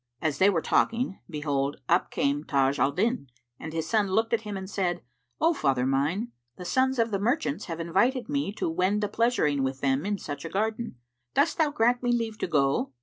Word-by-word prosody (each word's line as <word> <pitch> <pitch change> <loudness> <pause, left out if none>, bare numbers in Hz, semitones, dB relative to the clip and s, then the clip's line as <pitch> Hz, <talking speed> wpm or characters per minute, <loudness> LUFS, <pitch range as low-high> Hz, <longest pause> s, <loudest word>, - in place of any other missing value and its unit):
As 155 -1 -1
they 190 +1 +6
were 170 -5 0
talking, 230 -3 +1
behold, 145 -3 -1
up - - +2
came 145 +1 0
Taj 140 -1 +1
al 135 +3 +3
Din, 205 - 0 0.3
and 160 - -6
his 160 0 -3
son 215 -1 +2
looked 220 +4 +1
at 230 - +2
him 210 -2 -5
and 190 0 -6
said, 180 -3 -2 0.4
"O 330 +2 +4
father 135 - +1
mine, 150 - 0 0.3
the 180 - -8
sons 260 +6 +2
of 230 -1 +1
the 200 - 0
merchants 215 - 0
have 165 -2 -5
invited 235 +10 +1
me 285 -6 -1
to 215 - -2
wend 185 +5 +1
a - - +1
pleasuring 205 - +1
with 135 0 -2
them 135 +1 +1
in 205 +1 -1
such 145 -5 -6
a 165 - -5
garden. 220 - -2 0.4
Dost 295 +4 +2
thou 315 -2 +4
grant 245 -3 +2
me 245 -1 +1
leave 225 -2 -1
to - - -1
go?" 140 -3 +1
190 Hz, 210 wpm, -27 LUFS, 145-230 Hz, 0.4 s, they